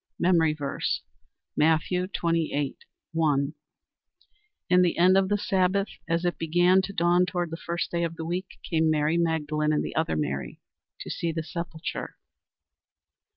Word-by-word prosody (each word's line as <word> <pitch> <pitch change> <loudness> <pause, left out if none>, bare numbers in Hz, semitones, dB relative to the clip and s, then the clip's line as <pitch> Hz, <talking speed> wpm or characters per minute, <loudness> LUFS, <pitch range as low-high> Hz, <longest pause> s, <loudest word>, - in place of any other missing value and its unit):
MEMORY 170 -3 +3
VERSE, 140 -2 -2 0.5
Matthew 160 +4 +2
28: 165 -6 -1 0.3
1 150 -3 +1 1.1
"In 180 0 +5
the 175 -2 +2
end 180 +2 +5
of 190 0 +3
the 205 - +2
Sabbath, 195 -1 +1 0.2
as 170 +1 +1
it 175 - -1
began 175 +3 +4
to 190 - -5
dawn 175 0 +3
toward 175 -2 -2
the 165 - -4
first 170 +1 -2
day 170 0 0
of 165 0 -2
the 160 - -5
week, 180 +3 -4
came 160 -2 +2
Mary 155 +1 +2
Magdalene 155 -2 0
and 150 - 0
the - - -6
other 160 - 0
Mary 70 -2 -3 0.4
to - - -6
see 170 - -2
the 160 0 -3
sepulchre." 170 0 -5
170 Hz, 155 wpm, -26 LUFS, 155-180 Hz, 1.1 s, In